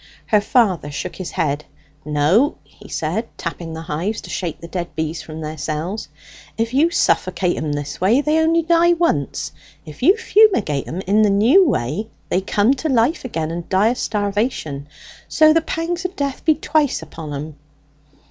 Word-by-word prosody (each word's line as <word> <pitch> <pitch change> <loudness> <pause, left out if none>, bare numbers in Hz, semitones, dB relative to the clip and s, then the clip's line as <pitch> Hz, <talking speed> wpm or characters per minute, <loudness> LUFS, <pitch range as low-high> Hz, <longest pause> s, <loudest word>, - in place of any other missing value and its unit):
Her 210 -1 +3
father 200 - +2
shook 145 - -5
his 185 -3 -5
head. 145 0 -1 0.4
"No," 155 - +2
he - - -17
said, - - -2
tapping 165 -2 -5
the 160 - -6
hives 175 +8 -2
to - - -10
shake 175 -4 -3
the 170 - -9
dead 170 -2 -5
bees 160 +1 -3
from 160 0 -8
their 155 0 -6
cells, 165 +9 -3 0.5
"if 230 +1 -1
you 300 +5 +4
suffocate 185 - +1
'em 155 -1 -2
this 145 +2 -5
way, 215 +8 +4
they 300 +2 +2
only 330 +1 +3
die 340 +1 +4
once: 330 - -1 0.3
if 155 -2 -11
you 375 - +5
fumigate 395 - +3
'em 175 +4 -4
in 200 +3 +2
the 210 - +4
new 245 - +5
way, 155 - -2 0.2
they 185 - +1
come 205 +5 +2
to 310 +3 -3
life 255 +5 +2
again, 165 -9 -3
and 170 0 -6
die 200 +4 +3
o' - - +1
starvation; 205 - -2 0.4
so 310 0 +5
the 330 - +3
pangs 335 +2 -3
o' 365 - -1
death 280 -3 -3
be 315 -2 +5
twice 295 - 0
upon 155 -1 -8
'em." 150 +2 -6
200 Hz, 180 wpm, -20 LUFS, -, 0.5 s, you